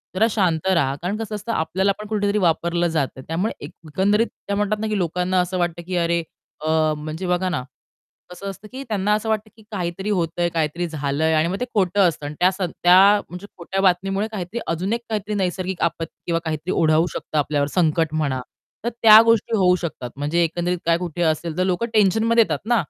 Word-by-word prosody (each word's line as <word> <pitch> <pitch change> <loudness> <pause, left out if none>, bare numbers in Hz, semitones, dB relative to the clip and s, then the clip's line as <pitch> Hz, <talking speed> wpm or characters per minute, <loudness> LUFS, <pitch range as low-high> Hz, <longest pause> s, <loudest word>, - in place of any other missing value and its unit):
जरा 220 +4 +4
शांत 180 -5 0
राहा. 140 -7 +2
कारण 190 +5 -2
कसं 220 -1 -4
असतं, 210 +3 -5
आपल्याला 190 +2 +1
पण 210 - -7
कुठेतरी 205 -1 0
वापरलं 170 -1 +1
जातं. 135 -3 -1
त्यामुळे 175 +7 -1
एक 160 - -10 0.2
एकंदरीत 205 +8 +2 0.2
त्या 200 - -1
म्हणतात 210 +1 0
ना, 220 - -2
की 215 - -1
लोकांना 180 +1 0
असं 180 +1 -3
वाटतं, 175 -1 -1
की 185 - -3
अरे, 170 0 +1 0.4
अ, 155 - -4 0.3
म्हणजे 155 +4 -5
बघा 180 +1 +1
ना 130 -8 -2 0.7
कसं 195 +2 -6
असतं, 200 +2 -10
की 265 +1 -6
त्यांना 210 -4 0
असं 215 +1 -1
वाटतं, 215 0 -1
की 220 - -17
काहीतरी 190 +1 -3
होतंय, 175 -2 0
काहीतरी 165 +1 -1
झालंय 155 +1 -1
आणि 155 +1 +2
मग 190 +3 -2
ते 250 - -1
खोटं 195 -1 +3
असतं 150 -3 -3
आणि 145 +1 -5
त्या 180 - +5 0.2
त्या 190 +4 +5
म्हणजे 180 +3 -9
खोट्या 190 +3 -3
बातमीमुळे 195 +2 +1
काहीतरी 205 +3 -4
अजून 180 +6 -1
एक 235 - -2
काहीतरी 215 -1 -2
नैसर्गिक 185 -1 -2
आपत्ती 165 0 -2
किंवा 165 -1 0
काहीतरी 155 +3 -3
ओढावू 160 +1 +3
शकतं 155 - -4
आपल्यावर, 145 0 0
संकट 160 -1 +1
म्हणा. 140 -5 -1 0.4
तर 235 - 0
त्या 220 0 +10
गोष्टी 230 0 +2
होऊ 180 -2 +4
शकतात 160 -8 -5
म्हणजे 150 +4 +1
एकंदरीत 175 +2 -1
काय, 165 0 +3
कुठे 175 -1 -5
असेल 160 +1 -1
तर 185 - +2
लोकं 185 +4 0
टेन्शनमध्ये 220 +3 +4
येतात - - -2
ना 240 - +4
180 Hz, 200 wpm, -22 LUFS, 165-205 Hz, 0.7 s, त्या